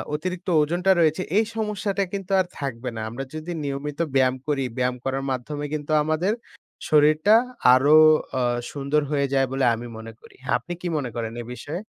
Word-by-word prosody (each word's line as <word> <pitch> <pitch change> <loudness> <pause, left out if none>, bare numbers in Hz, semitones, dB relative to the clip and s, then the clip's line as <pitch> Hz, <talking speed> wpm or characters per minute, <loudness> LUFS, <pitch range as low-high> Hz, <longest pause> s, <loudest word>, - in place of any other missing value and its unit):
অতিরিক্ত 180 +4 -5
ওজনটা 175 +5 +1
রয়েছে 160 +2 +2 0.2
এই 220 - +4
সমস্যাটা 205 -2 -1
কিন্তু 195 -1 -5
আর 185 - +2
থাকবে 125 -3 -4
না। 110 - -4
আমরা 130 +4 -5
যদি 155 +3 -6
নিয়মিত 140 +2 -4 0.2
ব্যায়াম 130 -1 +3
করি। 140 -2 0
ব্যায়াম 125 0 0
করার 135 +1 -1
মাধ্যমে 145 +4 -4
কিন্তু 150 0 -4
আমাদের 160 +7 0 0.6
শরীরটা 155 +7 +5 0.4
আরো 140 +4 +5 0.4
আ - - +1 0.3
সুন্দর 145 +1 0
হয়ে 140 -1 +1
যায় 135 -1 +3
বলে 135 -1 +1
আমি 120 +1 -7
মনে 115 0 -8
করি। - - -17 0.2
আপনি 175 +8 -7
কি 180 - -3
মনে 130 -4 -3
করেন 115 -1 -4
এ - - -7
বিষয়ে? 155 +8 -6
145 Hz, 175 wpm, -24 LUFS, 135-175 Hz, 0.6 s, শরীরটা